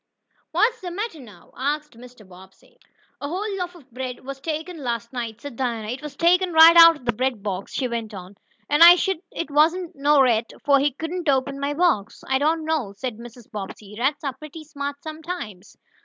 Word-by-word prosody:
"What's 460 +2 +1
the 365 - -5
matter 390 -1 -5
now?" 210 -9 -15
asked 295 +1 -3
Mr. 245 -3 -15
Bobbsey. 190 - -18 0.4
"A 285 - -3
whole 395 +4 -3
loaf 360 -1 -4
of 275 -7 -18
bread 255 +1 -6
was 270 0 -7
tooken 320 +3 -4
last 235 -2 -4
night," 230 -3 -5
said 285 -1 -9
Dinah. 230 -4 -3
"It 255 +3 -5
was 295 -2 -9
tooken 355 +1 +3
right 325 +1 +9
out 335 -1 +9
ob 260 - -16
de 240 - +2
bread 250 -2 -2
box," 195 -2 -4
she 260 - -1
went 230 -2 -4
on, 190 -1 -10 0.3
"and 295 +2 +1
I'se 345 +1 +10
shuah 385 -4 -1
it 335 - -5
wasn't 330 +4 +2
no 290 +1 +3
rat, 235 -4 +2
fo' 280 -1 +5
he 280 0 +1
couldn't 325 +3 -4
open 275 0 0
my 285 +1 -2
box." 295 - 0
"I 265 0 +1
don't 315 +2 +1
know," 305 -11 -1
said 245 -1 -4
Mrs. 240 -1 -13
Bobbsey. 205 0 -8
"Rats 285 +5 0
are 275 -3 -3
pretty 305 +1 -11
smart 285 -1 -6
sometimes." 310 - -7
280 Hz, 200 wpm, -23 LUFS, 235-325 Hz, 0.4 s, I'se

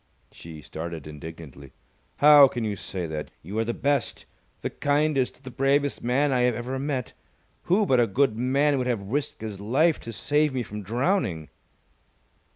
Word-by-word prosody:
She 80 -3 -11
started 80 +1 -7
indignantly. 75 -3 -10 0.4
"How 145 -1 +8
can 120 -3 -4
you 105 -2 -2
say 90 -1 -5
that? 75 -2 -5
You 100 +7 -4
are - - +2
the 120 +1 -3
best, 140 -3 -1 0.4
the - - -3
kindest, 145 -2 0
the 130 - -8
bravest 140 +2 +1
man 135 +4 +2
I 125 - +2
have 125 -1 +2
ever 125 +3 -4
met! 135 -4 -3 0.5
Who 200 +5 +3
but 130 -8 +3
a 120 - +4
good 125 +2 +1
man 135 +4 +2
would 125 - -1
have 105 -5 -2
risked 145 -3 -2
his 105 -3 -6
life 140 +11 +2
to 115 - -8
save 145 +5 0
me 125 - -1
from 105 -1 -7
drowning?" 115 - -1
125 Hz, 170 wpm, -25 LUFS, 100-140 Hz, 0.5 s, How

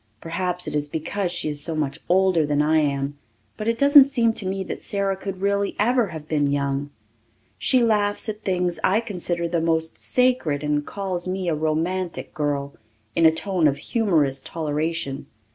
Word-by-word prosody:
Perhaps 180 +3 -3
it - - -4
is 145 0 -1
because 175 +5 -2
she 175 - -3
is 150 -1 0
so 160 +2 -1
much 150 -3 -2
older 185 -2 +3
than 145 -1 0
I 155 +2 +3
am, 140 -1 -1 0.4
but 215 - -5
it 230 0 +1
doesn't 280 +1 +8
seem 235 -5 +1
to 200 -4 -2
me 190 0 -2
that - - -6
Sara 195 -1 -1
could 190 -1 -6
really 200 0 0
ever 240 +1 +2
have 160 -3 -8
been 145 -2 +1
young. 140 0 -1 0.7
She 255 -2 +3
laughs 210 -2 +1
at 215 0 -4
things 180 -4 -1
I 200 +4 +3
consider 175 -5 -3
the 170 -1 -1
most 160 0 0
sacred 250 - +1
and 150 0 0
calls 185 0 -3
me 185 0 -2
a - - +1
romantic 165 +4 -2
girl, 145 -3 -2 0.4
in 165 - +6
a - - +6
tone 175 0 +1
of 140 -1 +1
humorous 150 - +1
toleration. 155 -2 -3
170 Hz, 180 wpm, -23 LUFS, 150-200 Hz, 0.7 s, doesn't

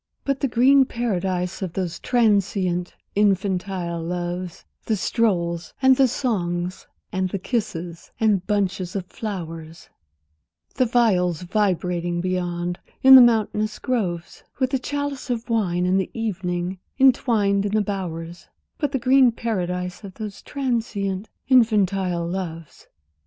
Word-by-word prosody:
But 275 -1 -1
the 275 - +1
green 265 +3 +5
paradise 190 -7 -2
of 185 -3 -4
those 175 -2 -3
transient 200 -6 +1 0.2
infantile 190 -3 0
loves, 175 +1 -4 0.2
The 220 - +2
strolls, 175 -6 -1
and 265 -1 +5
the 265 0 +4
songs, 180 -8 -2 0.2
and 185 0 -1
the 195 - -2
kisses, 180 -6 -4
and 210 -5 +2
bunches 195 -3 -1
of 190 -2 -2
flowers, 165 -6 -7 0.8
The 255 - +1
viols 185 -8 +2
vibrating 180 -3 0
beyond, 175 -1 -2 0.2
in 265 0 +9
the 260 - +12
mountainous 215 -2 +2
groves, 180 -9 -3
With 260 0 0
the 265 - +1
chalice 285 0 -4
of 235 -1 -3
wine 180 -6 +1
and 185 +1 +2
the - - -5
evening, 185 -4 -3 0.2
entwined, 220 -7 +3
in 205 - -4
the 215 - +3
bowers, 175 -4 -5 0.3
But 290 -2 -1
the - - +2
green 255 0 +5
paradise 180 -5 -3
of 195 -2 -9
those 210 -3 -7
transient 225 -7 -2 0.2
infantile 195 -8 +2
loves. 170 -3 -6
195 Hz, 130 wpm, -23 LUFS, 175-230 Hz, 0.8 s, the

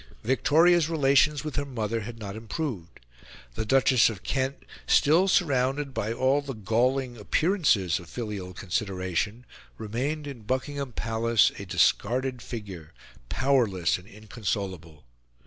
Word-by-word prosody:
Victoria's 160 +7 +4
relations 145 -1 +3
with 155 -2 -5
her 145 - +1
mother 115 -4 -2
had 115 +2 -7
not 100 -3 -7
improved. 110 - -5 0.5
The 110 - -4
Duchess 130 -1 +4
of 105 -3 -8
Kent, 135 0 -2 0.2
still 165 +6 +4
surrounded 140 -5 +1
by 110 -3 -2
all 130 +4 +2
the 140 -2 -6
galling 120 +4 0
appearances 110 - +1
of 85 -2 -13
filial 105 -6 -6
consideration, 95 +4 -2 0.3
remained 130 +8 -3
in 140 -5 -8
Buckingham 130 +4 -3
Palace 115 -1 +2
a 100 - -7
discarded 125 +7 +1
figure, 100 -10 -8 0.3
powerless 115 -12 +1
and 90 - -17
inconsolable. 100 - -5
120 Hz, 125 wpm, -27 LUFS, 105-140 Hz, 0.5 s, Victoria's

